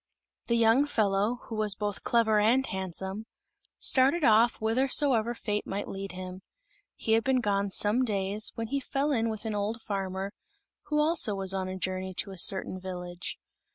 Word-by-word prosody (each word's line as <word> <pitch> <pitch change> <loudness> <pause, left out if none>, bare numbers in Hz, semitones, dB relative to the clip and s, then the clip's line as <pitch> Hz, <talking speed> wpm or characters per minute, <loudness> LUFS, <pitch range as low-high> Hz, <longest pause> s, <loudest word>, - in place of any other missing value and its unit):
The 235 - +2
young 230 +5 +4
fellow, 210 0 0
who - - -9
was 215 -2 +1
both 205 -1 -3
clever 220 -3 +2
and 240 +6 +3
handsome, 190 +2 -4 0.5
started 275 +6 +3
off 230 -1 +5
whithersoever 240 0 +2
fate 210 -2 -3
might 200 +1 -4
lead 195 -1 -6
him. 185 0 -8 0.5
He 220 - -3
had 225 0 +4
been 265 -1 +2
gone 200 -3 0
some 210 +6 +3
days, 205 -1 0
when 225 -1 -4
he 280 - 0
fell 275 +2 -1
in 230 -4 +1
with 220 0 -6
an 220 - -2
old 210 +3 -2
farmer, 195 -1 -4 0.5
who 300 0 0
also 300 -9 +2
was 195 -1 -1
on 190 -1 -2
a 185 0 -5
journey 185 0 -4
to 200 - -2
a 190 - -9
certain 185 +1 +3
village. 180 -1 -6
210 Hz, 175 wpm, -28 LUFS, 195-235 Hz, 0.5 s, off